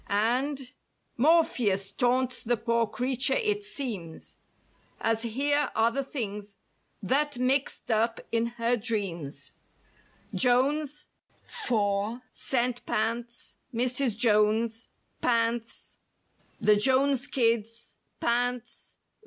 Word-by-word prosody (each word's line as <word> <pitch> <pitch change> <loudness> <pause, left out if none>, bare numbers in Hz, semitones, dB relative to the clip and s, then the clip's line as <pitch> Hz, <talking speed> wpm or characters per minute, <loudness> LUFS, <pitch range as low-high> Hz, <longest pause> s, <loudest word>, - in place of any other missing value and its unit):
AND— 255 +6 0 0.4
Morpheus 240 - +2
taunts 255 +1 +1
the 240 +1 0
poor 230 0 +1
creature 250 +4 +1
it 425 -4 0
seems, 240 - -6 0.6
As 225 0 0
here 280 +5 +1
are 225 +1 +3
the 275 +3 -2
things 210 -6 -5 0.5
that 285 +6 +1
mixed 255 0 0
up 225 +1 +1
in 230 0 +1
her 235 +1 +2
dreams: 195 - -3 0.8
JONES—^ 280 +4 +1 1.3
CENT 245 -1 -1
PANTS—MRS. 235 +1 -2
JONES 225 0 +2 0.3
—PANTS—THE 230 -2 -2
JONES 265 +3 +3
KIDS—PANTS. 235 +1 -2
240 Hz, 80 wpm, -28 LUFS, 225-260 Hz, 1.3 s, are